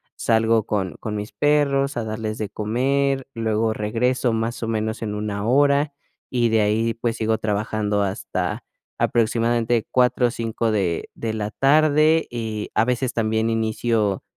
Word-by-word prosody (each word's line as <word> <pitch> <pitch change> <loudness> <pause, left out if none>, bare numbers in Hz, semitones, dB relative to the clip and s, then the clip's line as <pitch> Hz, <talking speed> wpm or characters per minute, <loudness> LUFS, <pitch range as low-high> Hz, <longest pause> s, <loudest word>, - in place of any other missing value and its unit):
salgo 115 -1 +2
con 95 -4 -2
con 105 -1 -4
mis 105 +1 -5
perros 140 -2 +2
a 115 - -1
darles 110 0 -4
de 105 -3 -3
comer, 135 +6 0
luego 110 0 0
regreso 120 +4 0
más 115 +1 -2
o - - -2
menos 110 0 -2
en 105 -2 -3
1 105 -1 -3
hora, 140 +3 +3 0.4
y 120 -2 +1
de 110 -1 +3
ahí, 110 +2 +1
pues 115 0 -2
sigo 110 0 +1
trabajando 105 -1 -1
hasta 95 -1 -3 0.3
aproximadamente 115 0 +1
4 125 -1 +3
o - - -3
5 115 -1 -2
de 95 -6 -1
de 110 -1 -3
la 105 -1 -3
tarde, 155 +4 +3
y 110 -3 -4
a 110 - +3
veces 125 0 -1
también 110 0 0
inicio, 110 -2 0
115 Hz, 155 wpm, -22 LUFS, 110-125 Hz, 0.4 s, hora